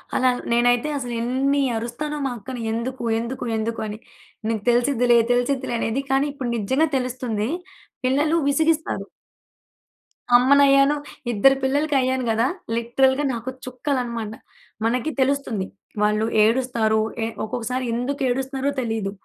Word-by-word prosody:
అలా 255 0 +4 0.2
నేనైతే 245 +4 +3
అసలు 245 -3 -4
ఎన్ని 270 +4 +1 0.2
అరుస్తానో 270 +7 -4
మా 265 - -1
అక్కని 240 +3 -7
ఎందుకు? 240 +2 -3 0.2
ఎందుకు? 240 +2 -4
ఎందుకు? 230 +1 -2
అని, 210 +1 -6 0.5
"నీకు 220 -2 -1
తెలిసిద్దిలే 245 -1 +3 0.2
తెలిసిద్దిలే" 245 0 0
అనేది. 250 +5 -1
కానీ 270 +2 +3
ఇప్పుడు 255 -4 -4
నిజంగా 260 +10 +1
తెలుస్తుంది. 250 -4 -2 0.6
పిల్లలు 295 +5 +2
విసిగిస్తారు! 320 +2 +1 1.3
అమ్మనయ్యాను. 275 +2 +5 0.4
ఇద్దరు 270 +6 +5
పిల్లలకయ్యాను 265 -2 +1
గదా! 225 +3 +2 0.3
లిటరల్‌గా 265 +4 +2
నాకు 235 +2 -4 0.2
చుక్కలన్నమాట. 250 -4 -3 0.5
మనకి 250 +6 0
తెలుస్తుంది, 260 -7 0 0.4
వాళ్ళు 210 +1 +2 0.2
ఏడుస్తారు. 225 -2 +2 0.2
ఎ - - -1 0.2
ఒక్కొక్కసారి 250 +3 -3
ఎందుకు 255 +4 -2
ఏడుస్తున్నారో 265 +2 -1
తెలీదు, 220 -4 -2
255 Hz, 115 wpm, -23 LUFS, 235-275 Hz, 1.3 s, అమ్మనయ్యాను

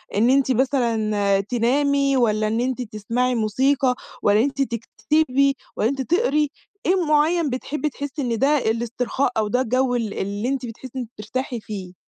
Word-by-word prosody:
إن 230 +4 +3
أنتِ 265 -1 +3
مثلًا 220 -6 +1
تنامي 275 +5 +1
والّا 215 -3 +2
إن 225 +2 0
أنتِ 255 0 -1
تسمّعي 235 +3 -1
موسيقى 255 +4 +2 0.3
والّا 205 +1 +4
إن - - +4
أنتِ 280 0 -1
تكتبي 270 +4 +1 0.2
والّا 220 - +1
إن 275 - -2
أنتِ 265 - -4
تقرئي، 300 -7 +2 0.4
إيه 370 - +4
معيّن 305 +1 +3
بتحبّي 295 +4 -2
تحسّي 285 +1 -5
إن 235 -3 -1
ده 290 +3 +4
الاسترخاء 240 +2 -1
أو 215 - +1
ده 250 +5 +1
الجو 255 +1 +1
ال 225 -4 -2
اللي 205 +4 -3
أنتِ 270 -2 -2
بتحسّي 235 +2 -9
إن 260 - -2
أنتِ 230 - -7
بترتاحي 240 +3 -4
فيه؟ 190 -4 -7
250 Hz, 175 wpm, -22 LUFS, 220-275 Hz, 0.4 s, والّا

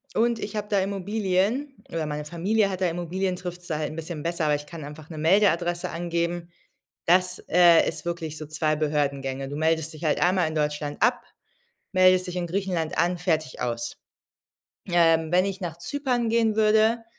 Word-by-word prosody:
und 235 0 +2
ich 215 - -5
habe 210 0 -3
da 200 -2 +2
Immobilien, 200 +7 -1
oder 165 -2 -2
meine 150 0 -4
Familie 195 +6 +1
hat 190 0 -5
da 180 - +3
Immobilien, 180 +2 -2
trifft's 180 -1 -7
da 155 - -2
halt 155 0 -3
'n - - -8
bisschen 165 -1 -6
besser, 170 -1 -1
aber 150 -1 +3
ich 145 0 -6
kann 160 -1 -9
einfach 150 +2 -10
'ne 155 - -7
Meldeadresse 175 0 +2
angeben. 170 0 -2 0.6
Das, 180 +1 +3
äh, 175 -1 +6
ist - - -3
wirklich 165 -3 -4
so 155 - -7
2 155 0 0
Behördengänge. 140 -3 -1
Du 145 - -5
meldest 160 0 +1
dich 155 +2 -11
halt 155 - +1
einmal 180 -2 +3
in 155 - -4
Deutschland 150 -1 -2
ab, - - +3 0.7
meldest 185 -1 +4
dich 180 0 -4
in 175 -1 -2
Griechenland 180 -3 -2
an, 175 +1 +2
fertig, 160 -6 -1
aus. 120 -1 -3 0.9
Ähm, 165 -2 +3
wenn 180 +2 +4
ich 195 0 -4
nach 170 -2 -4
Zypern 250 - -1
gehen 225 -2 +2
würde, 220 +2 +3
175 Hz, 185 wpm, -25 LUFS, 155-190 Hz, 0.9 s, äh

